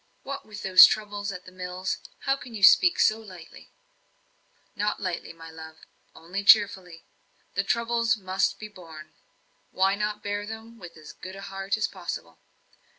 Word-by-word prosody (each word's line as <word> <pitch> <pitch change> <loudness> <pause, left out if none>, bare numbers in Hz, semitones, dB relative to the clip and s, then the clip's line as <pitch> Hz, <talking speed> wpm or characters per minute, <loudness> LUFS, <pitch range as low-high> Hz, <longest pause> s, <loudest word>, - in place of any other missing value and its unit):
"What, 275 -3 -7
with 210 -1 -9
those 185 -1 +9
troubles 205 -1 -3
at 180 -2 -9
the 185 - -12
mills? 185 0 -4 0.2
How 270 -1 +1
can 250 -4 -11
you 205 - -6
speak 360 - +6
so 215 - +3
lightly?" 185 -7 -13 1.1
"Not 210 +1 -1
lightly, 185 -3 -4
love 160 -1 -12 0.4
only 180 +5 -6
cheerfully. 190 -5 +4 0.5
The - - 0
troubles 235 0 0
must 190 -1 -1
be 215 - -8
borne; 165 -6 -13 0.6
why 190 +1 +2
not 210 +1 -3
bear 205 0 -3
them 225 +1 -10
with 175 -3 -12
as 155 -1 -12
good 185 +1 -10
heart 195 +1 -4
as 215 - 0
possible? 170 - -7
195 Hz, 150 wpm, -26 LUFS, 180-215 Hz, 1.1 s, those